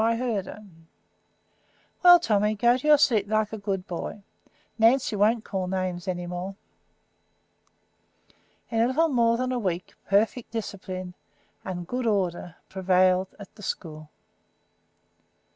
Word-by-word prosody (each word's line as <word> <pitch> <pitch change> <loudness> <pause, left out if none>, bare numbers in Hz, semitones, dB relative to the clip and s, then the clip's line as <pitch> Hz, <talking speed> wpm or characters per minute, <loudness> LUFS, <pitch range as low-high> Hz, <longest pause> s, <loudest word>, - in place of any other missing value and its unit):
I 230 +1 +2
heard 230 -6 -2
her." 210 - -10 1.4
"Well, 355 -1 +9
Tommy, 210 -6 +1
go 235 +4 +4
to 260 +4 -4
your 300 -1 +7
seat 220 -8 +2
like 215 0 0
a 220 - -5
good 195 -2 -3
boy. 190 +4 -6 0.6
Nancy 230 0 +3
won't 215 +3 +2
call 190 -2 -3
names 185 -1 -3
any 175 -1 -3
more." 180 +2 -5 2.2
In 225 - 0
a 235 - +4
little 320 +6 +2
more 235 -3 +2
than 255 +1 -1
a 250 - -1
week 180 -4 -3
perfect 220 +4 +1
discipline 185 -4 -6 0.5
and 180 -2 -5
good 245 +5 -3
order 180 -5 -1
prevailed 185 0 +2
in 200 - -8
the 215 - -15
school. 155 -6 -6
205 Hz, 135 wpm, -26 LUFS, 185-230 Hz, 2.2 s, Well